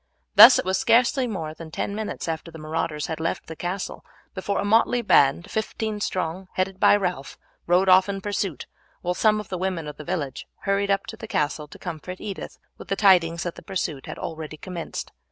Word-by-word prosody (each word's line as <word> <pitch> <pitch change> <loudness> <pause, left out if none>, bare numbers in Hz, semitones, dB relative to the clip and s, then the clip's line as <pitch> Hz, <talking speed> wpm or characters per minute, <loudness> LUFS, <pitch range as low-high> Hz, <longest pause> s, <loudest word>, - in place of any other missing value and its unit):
Thus - - +10
it - - -1
was 190 0 +1
scarcely 250 +3 +3
more 160 -8 -4
than 160 0 -10
ten 200 - -3
minutes 215 -3 -4
after 165 0 -4
the 165 - -11
marauders 155 -1 -3
had 160 - -4
left 165 +1 -2
the 160 - -8
castle 180 +4 -4 0.3
before 200 +1 -2
a - - -1
motley 230 +3 +3
band, 190 -3 +3
fifteen 220 -1 -2
strong, 185 -1 -2
headed 185 0 -1
by - - +6
Ralph, 180 -8 -3 0.3
rode 180 +2 +3
off 185 +1 +6
in 195 0 -2
pursuit, 195 - -3 0.4
while 180 0 -1
some 215 +3 +3
of 210 - -8
the 185 - -3
women 185 -3 -2
of 150 - -7
the 150 - -8
village 145 -6 -4
hurried 200 0 0
up 195 0 +1
to - - -8
the 225 - -8
castle 150 -3 -1
to - - -13
comfort 180 +1 -7
Edith 200 -3 -6 0.2
with - - -10
the 195 - 0
tidings 175 -5 +4
that 175 - -3
the - - -12
pursuit 175 -8 -4
had - - -6
already 155 -1 -6
commenced. 175 +1 -6
185 Hz, 210 wpm, -24 LUFS, 160-200 Hz, 0.4 s, Thus